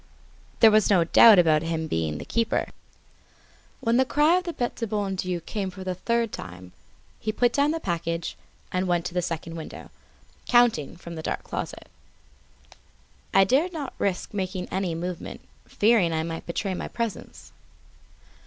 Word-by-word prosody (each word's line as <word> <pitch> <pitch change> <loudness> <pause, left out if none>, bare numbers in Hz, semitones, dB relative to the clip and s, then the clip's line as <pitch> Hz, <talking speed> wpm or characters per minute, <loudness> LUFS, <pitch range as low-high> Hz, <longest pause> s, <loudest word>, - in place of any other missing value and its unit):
There 225 - +8
was 215 -1 +4
no 185 -5 +5
doubt 215 +5 +8
about 160 -3 +4
his 165 -1 -2
being 80 - -1
the 75 - -7
keeper. 230 -1 0 1.2
As 230 +1 +3
the 260 - +5
cry 300 +6 +3
of 365 - -3
the 345 - -3
Bete 245 -5 -2
du 230 - -3
Bon 205 -2 -2
Dieu 185 -1 -2
came 195 +3 -4
for 185 +1 -9
the 185 -1 -2
third 235 +4 -1
time, 90 0 -9 0.5
he 215 - -2
put 240 +2 +2
down 285 +1 +3
the 325 +1 -1
package 170 - -3 0.4
and 185 +1 -1
went 175 -1 +1
to 180 - -4
the 180 - +1
second 165 -1 -4
window, 160 - -9 0.6
counting 240 - +3
from 170 -1 -9
the 160 - -6
dark - - -3
closet. - - -6 1.4
I 195 - +6
dared 290 - +2
not 295 -5 -5
risk 195 0 -2
making 185 -2 -3
any 185 -3 -2
movement, 175 +1 -5 0.3
fearing 205 -6 +3
I 160 0 0
might 165 0 -6
betray 190 +3 -2
my - - -4
presence. 230 -3 -5
185 Hz, 170 wpm, -25 LUFS, 165-230 Hz, 1.4 s, There